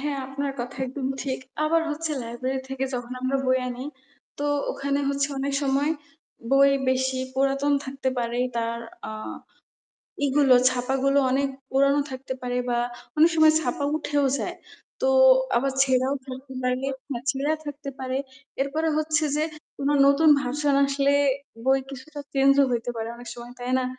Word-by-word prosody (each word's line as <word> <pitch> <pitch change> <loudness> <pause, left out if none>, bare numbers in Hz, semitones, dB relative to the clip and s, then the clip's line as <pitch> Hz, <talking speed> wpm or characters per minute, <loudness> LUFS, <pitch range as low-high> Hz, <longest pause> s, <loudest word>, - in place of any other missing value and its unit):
হ্যাঁ, 285 -1 -2
আপনার 275 +1 -3
কথা 240 +1 -6
একদম 260 +1 -4 0.2
ঠিক। 265 -2 -2 0.3
আবার 330 +2 +3
হচ্ছে 315 +2 -3
লাইব্রেরি 255 +3 -3
থেকে 265 0 -2
যখন 245 0 -4
আমরা 260 +1 0
বই 260 0 +3
আনি, 250 +1 -5 0.5
তো 290 - -2 0.3
ওখানে 280 +1 -1
হচ্ছে 280 0 0
অনেক 275 +1 -1
সময় 280 +2 +1 0.6
বই 275 0 +6 0.2
বেশি 260 0 +1 0.2
পুরাতন 275 +2 +1
থাকতে 265 0 -3
পারে। 235 0 -2 0.2
তার 230 0 -1 0.3
আ - - -5 1.1
ই - - +4
গুলো 275 -3 +6 0.2
ছাপাগুলো 265 +2 +1
অনেক 275 +2 +2 0.2
পুরানো 275 +2 +3
থাকতে 260 0 -5
পারে, 245 0 -2
বা 240 -1 +1 0.4
অনেক 320 +2 +6
সময় 315 -1 +7
ছাপা 285 0 -2
উঠেও 290 -2 0
যায়। - - -4 0.4
তো 265 - +2 0.5
আবার 270 +3 +1
ছেঁড়াও 260 0 +2
থাকতে 265 +1 -8
পারে, 250 0 +1 0.3
হ্যা 240 -3 -2
ছেঁড়া 285 +3 0
থাকতে 290 0 -6
পারে। 260 0 -3 0.4
এরপরে 310 +4 0
হচ্ছে 310 0 +1
যে, 305 - +1 0.3
কোনো 280 +1 +1
নতুন 280 +3 +5
ভার্সন 285 +2 0
আসলে 275 0 +2 0.5
বই 265 +1 +4
কিছুটা 285 +3 -8
চেঞ্জও 275 0 +5
হইতে 240 0 -1
পারে 225 0 -3
অনেক 245 0 -10
সময়। 240 0 -10
তাই 245 +1 -4
না? 260 - 0
270 Hz, 160 wpm, -25 LUFS, 255-280 Hz, 1.1 s, সময়